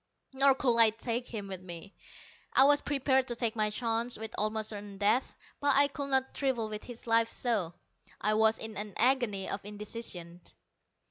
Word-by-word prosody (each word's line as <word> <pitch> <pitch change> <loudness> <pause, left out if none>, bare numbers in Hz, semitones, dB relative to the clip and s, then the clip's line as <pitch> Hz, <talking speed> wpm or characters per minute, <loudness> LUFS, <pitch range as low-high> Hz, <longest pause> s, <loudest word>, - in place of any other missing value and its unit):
Nor 270 0 +5
could 245 -3 +1
I 225 -1 +8
take 230 +2 -3
him 210 -4 -6
with 190 -2 -6
me. 180 +2 -9 0.6
I 265 - +7
was 290 +1 +5
prepared 265 -2 +1
to 240 - -2
take 230 -2 -1
my 215 -1 +1
chances 230 +2 -1
with 220 +1 -6
almost 215 +1 -1
certain 205 -2 -6
death, 210 +6 +1 0.2
but 285 -1 +2
I 280 +1 +5
could 280 0 -5
not 265 -1 +1
trifle 250 -6 -1
with 210 0 -6
his 240 -2 -10
life 230 0 +3
so. 205 -9 -1 0.4
I 210 +1 +1
was 220 +1 +4
in 220 -2 -6
an 210 -1 -5
agony 240 -6 +2
of 195 - -4
indecision. 205 -4 -6
225 Hz, 185 wpm, -30 LUFS, 210-255 Hz, 0.6 s, I